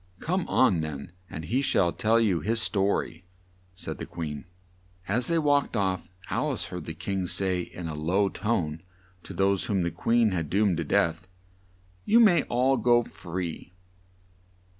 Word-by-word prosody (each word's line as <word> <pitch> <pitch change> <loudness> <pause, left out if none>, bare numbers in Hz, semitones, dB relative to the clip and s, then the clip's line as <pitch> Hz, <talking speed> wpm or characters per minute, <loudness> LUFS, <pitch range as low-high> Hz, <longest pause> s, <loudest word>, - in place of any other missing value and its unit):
"Come 180 +2 -1
on 95 -11 +3
then, 75 +1 -6 0.2
and 80 +1 -6
he 125 +9 0
shall 90 -10 +2
tell 110 +5 +2
you 100 -7 +2
his 110 +8 +1
sto 100 -1 +2
ry," 85 +1 -11 0.5
said 85 -4 -6
the - - -6
Queen. 75 -5 -6 0.6
As 120 +5 +1
they 170 - +1
walked 145 -2 +2
off, 95 -3 -1 0.2
Al - - 0
ice - - -3
heard - - -7
the - - -5
King 95 -2 -3
say 95 0 +1
in 85 0 -7
a 80 - -4
low 90 +7 +1
tone 85 -7 -2 0.4
to - - -11
those 95 0 +1
whom 95 -4 0
the 85 - -1
Queen 115 +5 +2
had 80 -5 -2
doomed 100 -1 +2
to 85 - -1
death, 80 +3 0 0.8
"You 230 - +4
may 200 -7 +6
all 130 +3 +2
go 120 -1 +4
free!" 90 -3 -6
95 Hz, 170 wpm, -27 LUFS, 85-115 Hz, 0.8 s, may